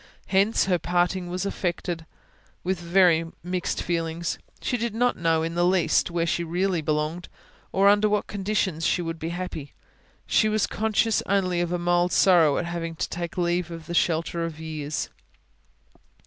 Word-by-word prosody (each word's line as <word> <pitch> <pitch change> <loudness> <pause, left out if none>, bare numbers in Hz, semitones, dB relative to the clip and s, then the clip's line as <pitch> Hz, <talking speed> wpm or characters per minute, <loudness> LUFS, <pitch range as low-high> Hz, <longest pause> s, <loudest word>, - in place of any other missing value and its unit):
Hence, 200 +3 +3
her 180 -2 +1
parting 175 +1 0
was 180 +2 -3
effected 175 -3 -3 0.6
with 185 -1 -1
very 175 -1 +4 0.2
mixed 180 0 -2
feelings; 165 0 -2 0.2
she 250 - -1
did 235 -2 -2
not 245 +2 +2
know 165 -1 +1
in 165 0 -2
the 175 +1 +1
least 180 -1 +3
where 170 -1 0
she 170 0 0
really 175 +1 0
belonged, 155 +3 -2 0.4
or 195 +1 +3
under 205 +1 +5
what 210 0 +1
conditions 195 -4 -1
she 175 - +1
would 165 -1 -4
be 165 - -3
happy; 170 -5 -5 0.5
she 215 - +3
was 215 -1 +2
conscious 220 0 +1
only 185 -3 +1
of 175 -1 -1
a 180 - 0
mild 175 0 +2
sorrow 165 -6 +5
at 175 - -1
having 170 -1 -4
to - - -2
take 170 +1 -5
leave 175 -1 0
of 165 -1 -8
the 170 - -6
shelter 170 0 +1
of 165 -2 -5
years. 155 -2 -4
175 Hz, 170 wpm, -25 LUFS, 165-190 Hz, 0.6 s, under